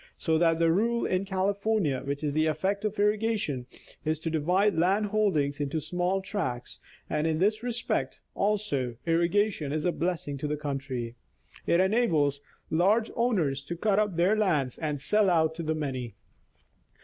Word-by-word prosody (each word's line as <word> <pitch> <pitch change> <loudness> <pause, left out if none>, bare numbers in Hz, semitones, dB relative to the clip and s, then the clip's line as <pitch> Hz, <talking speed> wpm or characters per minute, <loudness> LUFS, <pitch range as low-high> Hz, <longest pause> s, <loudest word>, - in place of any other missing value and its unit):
So 160 -2 +1
that 165 -1 +3
the 165 0 +3
rule 235 +6 +1
in 185 +1 0
California, 195 -5 0
which 140 +2 -4
is 145 -1 0
the 155 +1 +2
effect 190 +7 -1
of 215 0 -2
irrigation, 210 - 0 0.4
is 155 0 -1
to 165 - -2
divide 180 +7 +2
land 190 +6 +2
holdings 190 -10 +1
into 145 +2 -1
small 180 +5 -1
tracts, 185 - -4 0.3
and 150 +1 0
in 160 -1 +1
this 210 +5 +1
respect, 240 0 -2
also, 195 - -1
irrigation 170 -1 +1
is 155 +2 -2
a 180 - +3
blessing 165 -5 -2
to 150 - -2
the 150 0 -2
country. 135 -5 -4 0.5
It 170 - +4
enables 170 - +2 0.3
large 205 +8 +3
owners 185 - +1
to 145 +5 -6
cut 205 +2 +2
up 210 -4 0
their 180 +5 +3
lands 155 - 0
and 150 -3 -2
sell 210 +7 +2
out 160 -2 +3
to 165 - -6
the 160 -1 -1
many. 130 -7 -4
170 Hz, 165 wpm, -28 LUFS, 150-205 Hz, 0.5 s, It